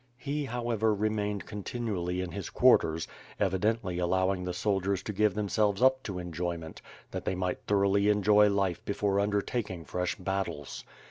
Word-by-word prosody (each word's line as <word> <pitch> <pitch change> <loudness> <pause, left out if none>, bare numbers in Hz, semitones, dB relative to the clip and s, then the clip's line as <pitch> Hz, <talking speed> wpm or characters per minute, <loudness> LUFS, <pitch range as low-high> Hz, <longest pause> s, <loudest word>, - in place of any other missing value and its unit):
He, 145 +3 -3
how 120 -1 -3
ever, 110 -1 +2
remained 105 -1 -1
continually 100 -4 -3
in 90 -1 -4
his - - -5
quarters, 80 0 +4 0.3
evidently 95 -1 0
allowing 95 +1 +1
the 90 - -2
soldiers 95 0 0
to 105 - -4
give 105 0 +2
themselves 105 -1 +1
up 130 +1 +4
to 100 -7 -5
enjoyment, 85 -1 -4 0.3
that - - -4
they 95 - -1
might 90 0 -2
thoroughly 100 0 +3
enjoy 105 0 +5
life 100 -4 0
before 100 -1 0
undertaking 100 -3 -1
fresh 90 0 -2
battles. 95 -7 -4
100 Hz, 150 wpm, -29 LUFS, 90-105 Hz, 0.3 s, enjoy